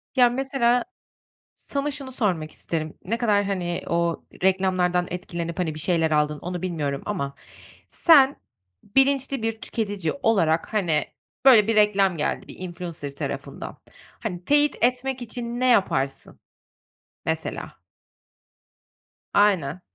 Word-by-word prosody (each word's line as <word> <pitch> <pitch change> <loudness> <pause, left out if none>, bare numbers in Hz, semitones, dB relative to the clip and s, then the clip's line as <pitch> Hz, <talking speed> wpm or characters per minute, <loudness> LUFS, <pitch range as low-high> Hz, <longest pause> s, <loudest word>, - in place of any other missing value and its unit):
Ya, 250 -2 +6
mesela 250 -1 +1 0.7
sana 280 +1 -2
şunu 275 -2 -7
sormak 180 -11 -1
isterim, 155 -2 -4
ne 225 +5 -1
kadar, 210 -4 +2
hani, 180 -3 -2
o 170 0 0 0.2
reklamlardan 185 -2 +2
etkilenip, 170 -1 -5
hani, 165 -4 0
bir - - -6
şeyler 165 -1 +1
aldın 150 0 +1
onu 180 0 -5
bilmiyorum 150 -6 -2
ama 140 -10 -3 0.5
sen 285 -5 +6 0.5
bilinçli 270 +2 +1
bir 225 0 -2
tüketici 205 -7 -2
olarak, 165 -7 +2
hani, 170 -8 +2 0.4
böyle 225 -6 +7
bir 225 - +2
reklam 200 -3 +4
geldi 150 - -2
bir - - -11
influencer 170 -5 -6
tarafından. - - -6 0.4
Hani, 180 -5 -5
teyit 290 +2 +3
etmek 255 +1 0
için 240 0 -5
ne 255 - +2
yaparsın? 140 - +1 0.9
Mesela? - - -3 1.5
Aynen. 185 -6 +2
195 Hz, 120 wpm, -24 LUFS, 170-240 Hz, 1.5 s, böyle